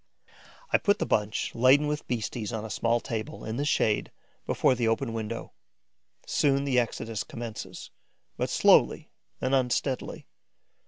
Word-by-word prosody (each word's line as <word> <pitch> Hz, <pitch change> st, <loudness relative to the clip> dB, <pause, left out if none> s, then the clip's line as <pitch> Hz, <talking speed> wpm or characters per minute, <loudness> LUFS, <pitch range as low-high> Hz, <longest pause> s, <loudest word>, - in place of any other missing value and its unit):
I -, -, +6 dB
put 205 Hz, -1 st, +2 dB
the -, -, -1 dB
bunch 105 Hz, 0 st, 0 dB
laden 130 Hz, +5 st, +5 dB
with 150 Hz, +1 st, -3 dB
beasties 115 Hz, -2 st, -3 dB
on 110 Hz, -1 st, -4 dB
a 110 Hz, -, -6 dB
small 115 Hz, +4 st, +1 dB
table, 115 Hz, +7 st, -5 dB
in 110 Hz, +1 st, -4 dB
the 145 Hz, -, -1 dB
shade, 110 Hz, -7 st, +1 dB, 0.4 s
before -, -, +3 dB
the 120 Hz, -2 st, 0 dB
open 115 Hz, +1 st, 0 dB
window. 115 Hz, 0 st, -5 dB, 0.7 s
Soon, 140 Hz, -1 st, +2 dB
the 135 Hz, -3 st, +2 dB
exodus 115 Hz, -2 st, -3 dB
commences, 115 Hz, -2 st, -7 dB, 0.4 s
but -, -, -2 dB
slowly -, -, +4 dB, 0.3 s
and 130 Hz, -, -1 dB
unsteadily. 130 Hz, 0 st, 0 dB
120 Hz, 145 wpm, -28 LUFS, 110-135 Hz, 0.7 s, I